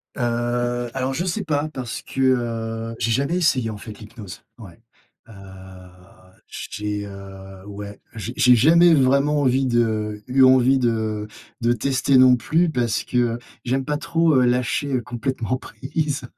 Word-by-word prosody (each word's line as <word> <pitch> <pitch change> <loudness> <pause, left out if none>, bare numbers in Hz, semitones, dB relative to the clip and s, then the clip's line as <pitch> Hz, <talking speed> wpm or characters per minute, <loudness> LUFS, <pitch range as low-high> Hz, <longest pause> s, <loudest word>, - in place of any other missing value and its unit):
Heu, 120 0 -1
alors 135 0 -2
je 170 +7 -2
sais 195 +3 -2
pas 150 -3 -1
parce 130 -6 -6
que, 135 - -5
heu, 115 -3 -1
j'ai 115 - 0
jamais 140 +9 0
essayé 135 -9 +1
en 105 - -7
fait 105 0 -10
l'hypnose. 105 -3 -11 0.2
Ouais. 105 -1 -13 0.5
Heu, 115 - -14 1.1
j - - -8
t 105 - -8 0.2
j'ai, - - -6
heu, 95 -1 -11
ouais, 100 0 -9 0.2
j'ai 115 +2 -6
j'ai 125 -1 +5
jamais 165 +8 +5
vraiment 140 +1 +3
envie 135 0 +2
de 110 -3 0
eu 130 +1 +3
envie 130 0 +5
de 110 -4 -1 0.3
de 120 +1 +2
tester 130 +2 +1
non 130 -1 +7
plus, 160 +9 +1
parce 120 -7 -1
que, 120 -2 0 0.3
j'aime 130 +2 -1
pas 150 0 -1
trop, 165 -1 +1
heu, 125 - +4
lâcher 125 +2 0
complètement 125 +1 -3
prise. 135 +4 -4
125 Hz, 160 wpm, -22 LUFS, 115-135 Hz, 1.1 s, non